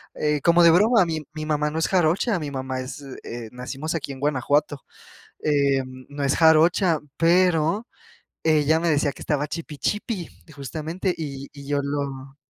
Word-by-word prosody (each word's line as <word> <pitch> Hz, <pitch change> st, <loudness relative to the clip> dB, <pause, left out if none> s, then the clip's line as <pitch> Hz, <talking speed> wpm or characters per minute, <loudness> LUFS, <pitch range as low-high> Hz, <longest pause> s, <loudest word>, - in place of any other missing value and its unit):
eh, 150 Hz, -1 st, 0 dB
como 170 Hz, +2 st, +5 dB
de 165 Hz, -, +8 dB
broma. 210 Hz, +3 st, +5 dB
Mi 160 Hz, -2 st, -3 dB
mi 155 Hz, -1 st, -5 dB
mamá 150 Hz, -1 st, 0 dB
no 160 Hz, -, -2 dB
es 165 Hz, -, +1 dB
jarocha, 185 Hz, +3 st, +2 dB
mi 150 Hz, -2 st, -5 dB
mamá 130 Hz, -1 st, -4 dB
es, 130 Hz, +3 st, -7 dB, 0.2 s
eh, 115 Hz, -1 st, -7 dB
nacimos 135 Hz, +6 st, -5 dB
aquí 145 Hz, -3 st, -4 dB
en 135 Hz, -, -8 dB
Guanajuato. 145 Hz, +1 st, 0 dB, 0.6 s
Eh, 140 Hz, -3 st, +2 dB, 0.3 s
no 145 Hz, 0 st, -6 dB
es 140 Hz, -, +1 dB
jarocha, 165 Hz, +1 st, +4 dB, 0.2 s
pero 175 Hz, +3 st, +3 dB, 0.6 s
ella 155 Hz, 0 st, +3 dB
me 170 Hz, -, 0 dB
decía 145 Hz, -1 st, +1 dB
que -, -, -15 dB
estaba 150 Hz, -1 st, -1 dB
chipi 155 Hz, -2 st, -6 dB
chipi, 210 Hz, -, -2 dB, 0.3 s
justamente, 155 Hz, +7 st, -3 dB
y 140 Hz, -3 st, -6 dB
y 140 Hz, -1 st, -11 dB
yo 145 Hz, 0 st, +1 dB
lo 140 Hz, -1 st, -4 dB
150 Hz, 170 wpm, -24 LUFS, 140-165 Hz, 0.6 s, de